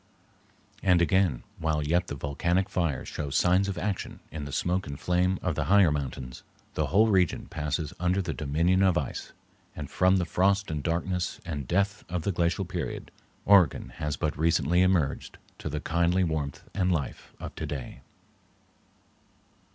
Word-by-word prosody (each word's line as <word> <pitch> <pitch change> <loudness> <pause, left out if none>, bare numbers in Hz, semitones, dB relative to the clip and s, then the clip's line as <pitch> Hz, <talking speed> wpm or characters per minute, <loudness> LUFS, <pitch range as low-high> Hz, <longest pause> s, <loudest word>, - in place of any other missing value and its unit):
And 90 -2 +4
again, 85 -5 +2 0.2
while 80 -2 0
yet 85 +4 +1
the - - -4
volcanic 85 +7 0
fires 85 -8 -1
show 75 -2 -4
signs 90 +7 +3
of 100 - -3
action 100 0 -3
in 75 -2 -5
the 70 - -6
smoke 90 +6 -1
and 70 -1 -6
flame 90 +1 +1
of 90 - 0
the 75 -1 -1
higher 95 -1 +5
mountains, 65 -3 -4 0.3
the 75 - 0
whole 100 +9 +4
region 95 -5 +2
passes 75 0 -3
under 90 +2 +1
the 90 -4 -2
dominion 85 +6 +1
of 95 -3 +4
ice, 70 - -4 0.4
and 75 -2 -6
from 95 +1 +4
the 90 - 0
frost 100 +2 +1
and 75 -1 -2
darkness 90 +2 -1
and 75 -6 -4
death 100 +3 0
of 90 -2 -2
the 100 - 0
Glacial 85 +2 0
Period, 90 -2 -5 0.3
Oregon 90 -11 +5
has 75 0 -2
but 80 -3 -1
recently 85 +2 +2
emerged 90 -7 +1 0.2
to - - -4
the 75 +1 -3
kindly 85 +4 +1
warmth 80 -4 -2
and 95 -2 +1
life 80 -6 -3
of - - -7
today. 65 -2 -6
85 Hz, 165 wpm, -28 LUFS, 75-95 Hz, 0.4 s, higher